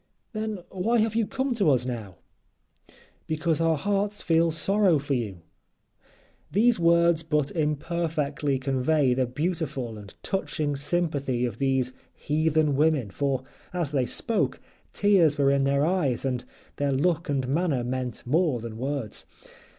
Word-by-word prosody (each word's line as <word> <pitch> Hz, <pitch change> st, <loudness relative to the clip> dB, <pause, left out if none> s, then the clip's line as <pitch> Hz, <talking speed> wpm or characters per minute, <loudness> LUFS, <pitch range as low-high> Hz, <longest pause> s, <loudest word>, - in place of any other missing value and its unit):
"Then 215 Hz, -4 st, -4 dB
why 210 Hz, +6 st, +1 dB
have 220 Hz, -1 st, +2 dB
you 225 Hz, -2 st, +1 dB
come 265 Hz, 0 st, -1 dB
to 205 Hz, -9 st, +2 dB
us 125 Hz, -3 st, +3 dB
now?" 110 Hz, -7 st, -5 dB, 1.1 s
"Because 160 Hz, +1 st, 0 dB
our 165 Hz, -1 st, +2 dB
hearts 205 Hz, +4 st, -1 dB
feel 165 Hz, 0 st, +3 dB
sorrow 185 Hz, +2 st, +3 dB
for 140 Hz, 0 st, -2 dB
you." 105 Hz, -9 st, -3 dB, 1.1 s
These 225 Hz, +1 st, +3 dB
words 170 Hz, -1 st, +4 dB
but 150 Hz, -3 st, 0 dB
imperfectly 150 Hz, -2 st, -1 dB
convey 135 Hz, +1 st, +1 dB
the 130 Hz, 0 st, 0 dB
beautiful 140 Hz, -5 st, -3 dB
and 100 Hz, -1 st, -11 dB
touching 155 Hz, -6 st, -2 dB
sympathy 140 Hz, -5 st, 0 dB
of 115 Hz, -3 st, -5 dB
these 130 Hz, -2 st, +1 dB, 0.2 s
heathen 155 Hz, -1 st, +1 dB
women, 145 Hz, -7 st, +2 dB
for 135 Hz, +3 st, -1 dB, 0.3 s
as 170 Hz, -5 st, -1 dB
they 130 Hz, -4 st, +1 dB
spoke, 225 Hz, -, 0 dB, 0.3 s
tears 185 Hz, -8 st, +3 dB
were 140 Hz, -1 st, +3 dB
in 140 Hz, 0 st, +2 dB
their 140 Hz, +1 st, +2 dB
eyes, 155 Hz, -9 st, 0 dB
and 125 Hz, -2 st, -2 dB, 0.3 s
their 145 Hz, -1 st, 0 dB
look 165 Hz, +4 st, +1 dB
and 135 Hz, -3 st, 0 dB
manner 145 Hz, -3 st, 0 dB
meant 125 Hz, -1 st, -4 dB
more 150 Hz, -1 st, +2 dB
than 115 Hz, -1 st, -7 dB
words. 135 Hz, -4 st, -3 dB
150 Hz, 145 wpm, -26 LUFS, 130-170 Hz, 1.1 s, words